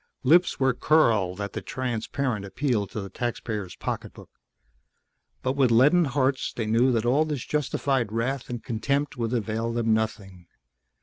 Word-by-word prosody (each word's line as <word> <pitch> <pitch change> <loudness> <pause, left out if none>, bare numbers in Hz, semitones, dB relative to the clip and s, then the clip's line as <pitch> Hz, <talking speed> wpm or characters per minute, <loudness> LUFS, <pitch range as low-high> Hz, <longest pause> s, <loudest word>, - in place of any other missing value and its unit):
Lips 170 +6 +4
were 135 -1 +3
curled 115 - +2
at 100 -1 -4
the - - -4
transparent 125 -2 -3
appeal 105 +1 -1
to 105 - -6
the 100 -1 -6
taxpayer's 110 -5 -4
pocketbook. - - -6 1.1
But 130 - +1
with 135 -3 +3
leaden 145 +9 +5
hearts 135 -1 0
they 115 - -3
knew 115 +4 +3
that 115 -2 0
all 135 +6 +3
this 150 -5 -4
justified 135 -5 -1
wrath 120 +4 -2
and 120 -2 -5
contempt 140 +6 -1
would 115 -2 -2
avail 115 -1 -1
them 115 -1 +1
nothing. 100 -5 -3
120 Hz, 150 wpm, -26 LUFS, 110-135 Hz, 1.1 s, leaden